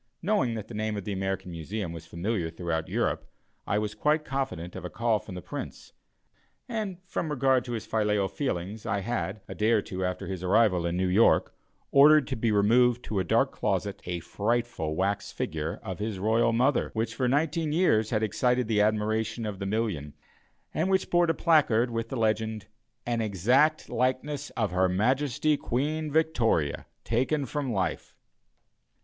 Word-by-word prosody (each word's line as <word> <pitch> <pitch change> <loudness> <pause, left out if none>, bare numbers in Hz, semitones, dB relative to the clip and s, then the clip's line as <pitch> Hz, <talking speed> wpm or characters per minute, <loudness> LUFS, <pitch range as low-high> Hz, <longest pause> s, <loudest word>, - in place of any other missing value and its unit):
Knowing 190 - +1
that 110 -2 -6
the - - -10
name 110 0 -2
of 100 - -4
the 105 - -2
American 95 -1 -3
Museum 85 +2 -4
was 80 -1 -9
familiar 85 0 -2
throughout 80 -1 -3
Europe, - - -1 0.4
I 100 - +1
was 105 0 -1
quite 150 +7 +1
confident 135 -11 -3
of - - -7
a 90 - -4
call 115 0 +1
from 95 - -10
the 90 - -7
Prince, - - -7 0.7
and 215 -6 -3
from 165 - -3
regard 135 -3 +2
to 120 - -4
his 115 - -4
filial 105 -2 +1
feelings 105 - -3
I 100 - -1
had, 100 -2 -3
a - - -6
day 105 +1 +1
or 110 - +3
two 95 0 -4
after 90 0 -2
his 95 -2 -5
arrival 95 -3 +3
in 85 +1 -2
New 95 0 +1
York, 100 +6 +4 0.4
ordered 150 +1 +7
to - - -1
be 110 0 0
removed 120 +4 +4
to 105 - -2
a - - +1
dark 85 - +2
closet 100 -1 -2
a 90 -1 -3
frightful 105 -6 -1
wax 100 +3 -1
figure 80 0 -3
of 95 -5 -5
his 105 -1 -3
royal 115 +4 +2
mother, 125 +4 +2
which, 115 0 -1
for 125 +2 0
nineteen 150 +3 +1
years, 130 -11 +3
had 110 -2 0
excited 125 +3 +1
the 110 -2 +2
admiration 110 +2 0
of 105 -3 -5
the 100 - -3
million 95 -9 -2 0.6
and 170 +4 0
which 190 -1 +1
bore 175 0 +4
a - - +4
placard 130 -9 +3
with 115 0 -3
the 135 - -4
legend, 110 -1 0 0.4
"An 120 -1 0
exact 125 - +2
likeness 130 +3 -1
of 110 -5 0
Her 90 +1 +2
Majesty 130 +9 +1
Queen 150 +6 -2
Victoria, 120 - +1 0.2
taken 130 +5 0
from 135 0 -3
life." 95 -6 -2
110 Hz, 180 wpm, -28 LUFS, 95-130 Hz, 0.7 s, ordered